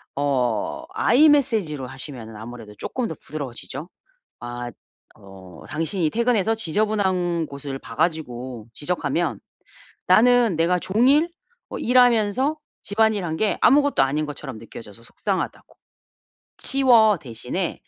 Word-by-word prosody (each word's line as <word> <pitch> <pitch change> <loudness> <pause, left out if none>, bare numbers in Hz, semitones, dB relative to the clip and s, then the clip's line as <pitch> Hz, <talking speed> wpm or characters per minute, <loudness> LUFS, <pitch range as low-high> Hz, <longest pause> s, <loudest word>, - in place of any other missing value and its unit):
어 130 - -1
I 310 - +4
Message로 220 - +2
하시면은 130 -4 -8
아무래도 110 -1 -10
조금 250 -2 -3
더 160 - -6
부드러워지죠. 140 +2 -7 0.5
아 120 0 -6 0.5
어 95 -4 -14
"당신이 165 +1 -1
퇴근해서 225 0 +1
지저분한 190 -4 0
곳을 140 -1 -6
봐 115 -2 -11
가지고 130 -8 -2
지적하면 165 +1 -2 0.7
나는 245 -3 +5
내가 170 +3 +2
종일 260 - +3 0.4
어 - - -6
일하면서 245 +3 +3 0.3
집안일한 205 -5 +1
게 215 +4 0
아무것도 285 - +4
아닌 145 +3 -1
것처럼 145 -5 -7
느껴져서 115 -1 -12
속상하다."고. 115 - -4 0.8
"'치워.' 235 -6 +4
대신에 125 +8 -4
165 Hz, 300 characters per minute, -23 LUFS, -, 0.8 s, 나는